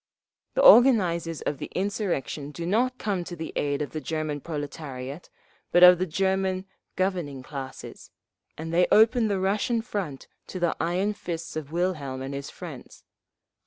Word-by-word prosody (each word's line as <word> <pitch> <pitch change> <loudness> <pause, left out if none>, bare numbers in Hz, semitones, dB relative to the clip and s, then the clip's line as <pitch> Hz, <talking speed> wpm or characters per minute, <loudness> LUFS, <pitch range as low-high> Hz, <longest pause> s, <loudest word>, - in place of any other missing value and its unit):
"… - - -60
The - - +2
organisers 185 - +6
of 145 - -3
the - - -6
insurrection 185 -7 -2
do 165 +3 -6
not 245 +7 +1
come 195 -7 -2
to 175 - -7
the 160 -1 -6
aid 145 0 0
of 145 - -7
the 155 - -4
German 155 -2 -3
proletariat, 145 -1 -6 0.4
but 175 - +5
of 180 -1 +9
the 185 - 0
German 190 +2 0 0.3
governing 175 -8 -2
classes, 135 -2 -8 0.5
and 160 +1 -5
they 180 +1 +4
open 225 +1 +5
the 200 -2 0
Russian 210 +5 +1
front 185 - -5 0.2
to 185 - -6
the 175 -2 +1
iron 185 +5 0
fists 165 -5 -6
of 155 -2 -5
Wilhelm 155 -7 -2
and 135 +1 -5
his 140 0 -5
friends…. - - -10
175 Hz, 160 wpm, -26 LUFS, 150-195 Hz, 0.5 s, of